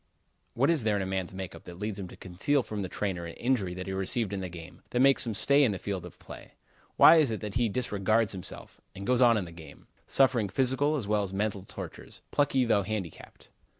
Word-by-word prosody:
What 135 +6 +3
is 155 -8 +2
there 110 -1 +2
in 100 - 0
a - - -3
man's 95 -1 -2
make 95 -1 -6
up - - -13
that 85 -1 -10
leads 105 +1 -4
him 95 - -5
to - - -13
conceal 110 +10 0
from 105 -3 -5
the 95 - -4
trainer 90 -5 -3
an 85 - -9
injury 115 -8 -1
that 90 0 -5
he 95 - -4
receives 95 +2 -2
in 95 -1 -3
a 90 - -4
game; 85 -1 -11
that 125 - -1
makes 135 -1 +4
him 110 - -2
stay 140 +7 +4
in 115 -6 +3
the - - -4
field 95 -2 -4
of 90 - -15
play? - - -12 0.4
Why 165 - +9
is 155 -5 +4
it 110 - -3
that 105 -2 -5
he 120 -1 +1
disregards 110 -1 0
himself, 95 -2 -8
and 100 0 -7
goes 125 +2 +2
on 120 -2 +6
in 100 - -2
the 85 - -10
game, 80 -4 -13 0.2
suffering 125 -6 +3
physical 130 +7 +1
as 125 -9 -3
well 105 0 +2
as 100 -2 -4
mental 100 0 -2
tortures, - - -9
plucky 135 -3 +2
though 110 -3 +3
handicapped? 100 -5 -6
105 Hz, 245 wpm, -29 LUFS, 95-125 Hz, 0.4 s, Why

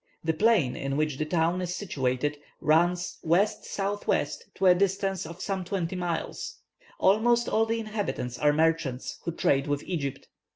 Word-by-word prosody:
The 160 0 +1
plain 190 - +3
in 135 0 -2
which 150 -3 0
the 155 - -1
town 170 +2 +1
is 180 0 -3
situated 145 -5 -1 0.2
runs 175 +3 +2
W.S.W., 200 +2 +1 0.3
to 195 - 0
a 180 - +8
distance 195 -1 0
of 170 +3 -8
some 195 -2 -2
twenty 185 -1 -2
miles. 180 - -3 0.4
Almost 235 +4 +4
all 225 +1 +2
the 230 +1 0
inhabitants 210 - -3
are 150 0 +4
merchants, 155 -4 0
who 170 - -1
trade 140 -3 +1
with 145 0 -1
Egypt. 140 -6 -4
175 Hz, 155 wpm, -28 LUFS, 150-195 Hz, 0.4 s, a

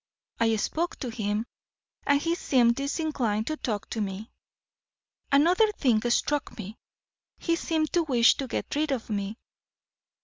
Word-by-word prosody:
I 225 -1 +3
spoke 325 +10 -1
to 255 - -2
him, 215 -1 -2 0.6
and 285 0 +4
he 330 +3 0
seemed 250 -9 +3
disinclined 275 -7 -1
to 310 +3 -3
talk 210 -7 -3
to 220 - -2
me. 200 +2 -5 1.0
Another 355 +10 +4
thing 240 - +2
struck 290 +4 0
me 210 0 -7 0.6
he 335 - 0
seemed 320 -2 -1
to 345 - +4
wish 250 -7 +5
to 270 - -3
get - - -3
rid 305 +1 +1
of 240 -4 -3
me. 205 +1 -3
255 Hz, 145 wpm, -27 LUFS, 220-310 Hz, 1.0 s, wish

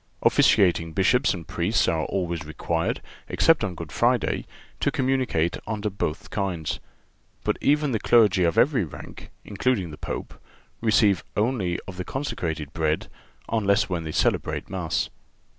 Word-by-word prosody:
Officiating 85 -4 +4
Bishops 125 - +3
and 85 -4 -5
Priests 95 +6 +1
are 80 -1 +1
always 85 -4 -2
required, 80 +2 -2 0.3
except 165 -6 +4
on 95 -4 -2
Good 80 -3 -7
Friday, 120 -3 +1 0.3
to - - +2
communicate 130 -11 0
under 105 -1 -2
both 80 -5 -4
kinds. 90 -7 -2 0.6
But - - 0
even 150 0 +2
the 110 - 0
clergy 105 -4 +4
of 85 -2 +1
every 135 -5 +4
rank, 80 - -10 0.2
including 100 -4 0
the 75 - -9
Pope, - - -5 0.5
receive 105 -4 +3
only 105 -6 +1
of 95 -2 -8
the 90 - -3
consecrated 80 - -4
bread 80 -2 0 0.4
unless 100 -3 +2
when 85 -3 -2
they 80 - -4
celebrate - - 0
Mass. 90 -4 -1
95 Hz, 140 wpm, -25 LUFS, 85-115 Hz, 0.6 s, Officiating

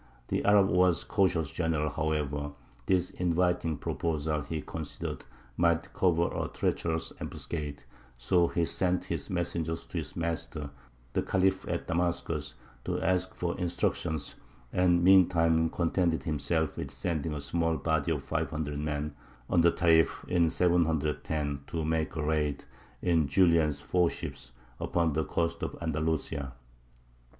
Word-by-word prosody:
The - - 0
Arab 100 -1 +5
was 90 -2 +3
a - - -17
cautious 85 -7 +1
general, 80 -1 0
however; 75 -2 -1 0.3
this 90 -1 +2
inviting 90 -2 +1
proposal, 80 -2 -1
he 80 +2 -4
considered, - - -6 0.3
might 85 +2 +2
cover 85 -2 +3
a - - -1
treacherous 80 -1 -1
ambuscade; 75 -5 -5 0.3
so 85 +8 +3
he 85 0 0
sent 90 +1 0 0.2
messengers 85 -2 -2
to - - -4
his - - -7
master 80 -3 -3 0.4
the - - +2
Khalif 95 0 +1
at - - -2
Damascus, 85 -4 -1 0.3
to - - -1
ask 95 +1 0
for 85 -1 -2
instructions, 80 -4 -1 0.4
and 90 -1 +3
meantime 85 -3 +5
contented 85 0 +1
himself 80 +1 0
with 70 - -4
sending 75 +2 -2
a - - -3
small 80 +3 0
body 80 0 0
of 75 -4 -1
five 80 +3 -1
hundred 75 -2 -3
men, 75 0 -2 0.4
under 85 0 +5
Tarīf, 80 -1 +3
in 85 -2 +3
710, 80 -4 +1
to 80 -2 -2
make 80 +1 -1
a 75 - -2
raid, 75 -2 0 0.4
in 85 -4 +3
Julian's 80 -2 +3
four 90 +2 +2
ships, - - -7 0.3
upon 85 -3 +1
the 80 +2 +1
coast 85 -1 -1
of - - -4
Andalusia. 80 -3 -2
80 Hz, 135 wpm, -30 LUFS, 75-85 Hz, 0.4 s, Arab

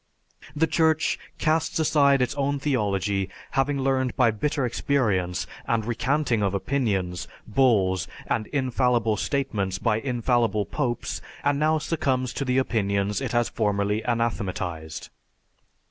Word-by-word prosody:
The 155 +2 +3
Church 160 -1 +2 0.2
casts 160 0 +1
aside 140 -4 +4
its 125 - -1
own 140 0 0
theology, 100 -8 0 0.2
having 135 +1 +1
learned 130 -1 0
by 125 -4 +4
bitter 135 +5 -1
experience 105 -9 0 0.2
and 115 -2 +1
recanting 125 0 0
of 100 -1 +1
opinions, 95 -7 -1 0.2
bulls, 105 -7 +2 0.2
and 110 - -1
infallible 125 -5 +1
statements 105 -7 -1
by 105 +3 +1
infallible 120 -4 +1
popes, 125 -6 -2 0.2
and 145 0 +2
now 155 +1 +3
succumbs 135 -6 -1
to 140 - -3
the 125 0 +1
opinions 100 -4 0
it 125 -4 -3
has 120 -1 +2
formerly 105 0 0
anathematized. 95 -10 -2
120 Hz, 125 wpm, -25 LUFS, 105-140 Hz, 0.2 s, aside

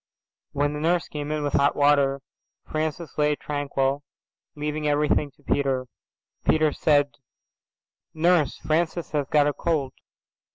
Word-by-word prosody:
When 145 +1 0
the 150 - -4
nurse 170 +2 +1
came 150 0 -5
in 155 -1 -1
with 145 - -2
hot 140 +1 +3
water 140 -1 +3 0.4
Francis 155 +1 -3
lay 150 0 +3
tranquil 140 -1 -1 0.5
leaving 150 +1 -2
everything 150 0 +2
to 145 - -27
Peter. 135 -3 0 0.6
Peter 155 -1 +3
said, 145 -1 +2 1.0
"Nurse, 165 -2 +2
Francis 165 +2 -1
has 145 -3 -1
got 150 -1 +4
a 145 - +1
cold." 145 -6 -1
150 Hz, 130 wpm, -25 LUFS, 145-155 Hz, 1.0 s, got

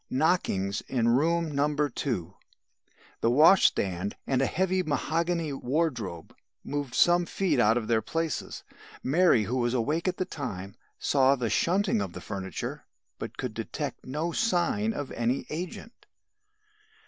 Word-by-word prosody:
Knockings 130 - +1
in 120 -3 +1
room 160 +6 +2
No. 145 +1 +2
2. 120 - -1 0.9
The 115 - +2
washstand 105 - +4
and 130 -1 +1
a 135 - +2
heavy 185 +4 +1
mahogany 165 +1 -1
wardrobe 125 - -2 0.3
moved 145 -3 -4
some 175 0 +4
feet 195 -2 0
out 110 +3 +4
of 110 -3 -2
their 115 -1 +2
places. 165 +3 -3 0.4
Mary, 150 -5 +4
who 120 +6 -2
was 120 0 +1
awake 150 +9 0
at 185 - 0
the 185 - -1
time, 100 - -6 0.2
saw 135 -1 +3
the 120 -5 -2
shunting 200 - +2
of - - -4
the - - -7
furniture, 95 -4 -5 0.3
but - - -6
could - - -4
detect - - -5
no 150 +6 -3
sign 205 +2 +1
of 145 -10 -5
any 120 +3 -1
agent. 180 +8 -7
145 Hz, 140 wpm, -28 LUFS, 115-170 Hz, 0.9 s, washstand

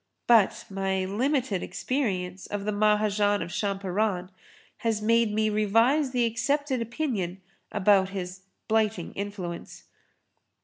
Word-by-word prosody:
But 230 -5 +4
my 190 -1 -1
limited 235 0 0
experience 190 -9 -2
of 205 -1 -4
the 210 - 0
Mahajan 210 -1 +2
of 170 - -8
Champaran 195 -1 -1 0.5
has 225 -2 0
made 230 +1 +3
me 215 +1 +1
revise 225 +7 +3
the 250 -2 +1
accepted 265 +3 0
opinion 230 - -2 0.3
about 195 -2 +3
his 185 -1 -6 0.3
'blighting 215 -5 0
influence.' 195 -4 -6
210 Hz, 115 wpm, -27 LUFS, 195-230 Hz, 0.5 s, But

